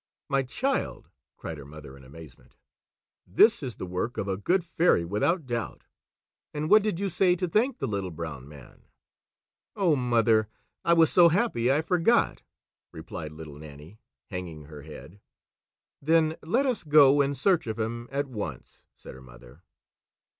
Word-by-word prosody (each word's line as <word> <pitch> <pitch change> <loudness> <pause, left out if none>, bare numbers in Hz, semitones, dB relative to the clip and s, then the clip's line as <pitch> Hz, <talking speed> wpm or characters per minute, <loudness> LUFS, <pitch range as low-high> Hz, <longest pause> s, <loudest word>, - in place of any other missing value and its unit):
"My 135 -1 +2
child!" 260 - -3 0.3
cried 80 -2 -7
her 70 - -10
mother 75 -2 -12
in 70 - -16
amazement, 75 0 -15 0.7
"this 215 - +4
is 130 -5 -5
the - - -6
work 90 +7 -4
of 100 - -3
a 95 - -1
good 175 - 0
fairy 170 - +2
without 135 - 0
doubt! 120 -2 -4 0.7
And 150 +1 -3
what 215 - +8
did 205 -4 -2
you 200 - -1
say 180 0 +2
to 180 0 -2
thank 230 +9 +1
the - - -3
Little 100 -3 -3
Brown 80 -5 -7
Man?" 70 -4 -15 0.9
"Oh, 180 -6 +2
mother, 115 -4 +2 0.3
I 170 - +3
was 165 -2 +4
so 175 -2 +6
happy 160 - +1
I 150 +3 +1
forgot," 180 +7 +1 0.5
replied 80 -1 -8
Little 75 -2 -10
Nannie, 75 +6 -13 0.3
hanging 85 -5 -6
her 75 0 -11
head. 80 +5 -12 0.8
"Then 160 +1 +2
let 230 - 0
us 255 -5 -1
go 145 -2 +6
in 140 0 0
search 175 +1 +1
of 110 0 -4
him 115 +2 -4
at 140 +1 -1
once," 105 - -8
said - - -12
her 65 - -13
mother. 60 +3 -16
120 Hz, 160 wpm, -27 LUFS, -, 0.9 s, what